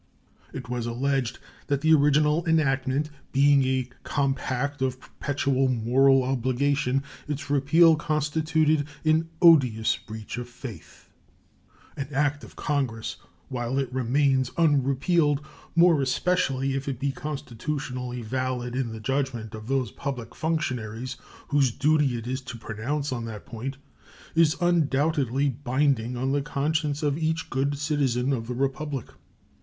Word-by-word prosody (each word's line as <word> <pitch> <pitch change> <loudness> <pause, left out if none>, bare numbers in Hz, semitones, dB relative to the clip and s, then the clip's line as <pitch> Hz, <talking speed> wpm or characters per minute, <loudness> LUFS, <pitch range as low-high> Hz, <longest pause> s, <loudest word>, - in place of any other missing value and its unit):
It - - -7
was 120 -1 -3
alleged 130 0 -1 0.3
that 140 -1 0
the 160 +1 +5
original 150 +2 +4
enactment 145 -2 +1 0.2
being 140 0 +5
a 130 -1 0
compact 140 0 -1
of 130 -1 -1
perpetual 135 0 -1
moral 130 +3 +4
obligation, 135 +1 0 0.2
its 145 -1 -4
repeal 160 +4 +5
constituted 155 0 +1 0.2
an 160 +1 +2
odious 125 -10 +5
breach 110 +2 -7
of 120 0 -7
faith. 125 -2 -10 0.9
An 140 - -4
act 145 +1 0
of - - -12
Congress, 130 -7 -2 0.3
while 125 0 -2
it 135 -2 -1
remains 130 +1 +2
unrepealed, 145 0 +3 0.4
more 170 -3 +5
especially 135 -2 +1
if 135 +1 -3
it 130 -4 -3
be 140 0 0
constitutionally 130 -3 -4
valid 125 +1 -2
in 130 -3 -1
the 110 - -7
judgment 120 -2 -2
of 110 0 -8
those 130 -4 0
public 125 -5 -5
functionaries 130 -6 -2 0.3
whose 140 -2 +3
duty 145 -1 +2
it 115 - -7
is 130 +2 -3
to 120 - -8
pronounce 125 +7 -3
on 120 -2 -3
that 110 -3 -7
point, 125 +4 -6 0.6
is 165 -1 +4
undoubtedly 145 -5 +2
binding 130 -2 0
on 130 +2 0
the 140 0 +1
conscience 150 +1 -1
of 145 +1 +1
each 160 0 -1
good 140 +2 0
citizen 140 -3 0
of 115 -3 -3
the 125 - -3
Republic. 135 0 -2
135 Hz, 135 wpm, -26 LUFS, 125-145 Hz, 0.9 s, the